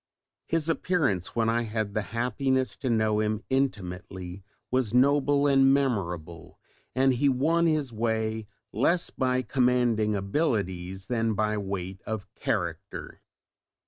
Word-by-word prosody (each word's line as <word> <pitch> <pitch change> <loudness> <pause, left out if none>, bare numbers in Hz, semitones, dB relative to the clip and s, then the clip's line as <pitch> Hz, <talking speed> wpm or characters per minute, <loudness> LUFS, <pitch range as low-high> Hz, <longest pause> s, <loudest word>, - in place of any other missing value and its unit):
His 165 -1 0
appearance 155 - 0
when 115 -1 +2
I 115 +1 +2
had 110 -2 -3
the 110 - 0
happiness 130 +3 0
to 130 - -3
know 110 -2 +2
him 110 0 -1
intimately 95 -7 -2 0.3
was 125 -3 +1
noble 140 +2 +4
and 135 -1 +5
memorable, 90 - -2 0.4
and 130 0 +4
he 140 +3 +2
won 160 +6 +2
his 150 -6 0
way 110 -1 -1 0.3
less 175 0 +2
by 130 0 0
commanding 120 -3 +2
abilities 95 - -1
than 115 -1 0
by 105 +1 +1
weight 95 -2 -4
of 110 -3 -3
character. - - -4
115 Hz, 125 wpm, -27 LUFS, 100-135 Hz, 0.4 s, and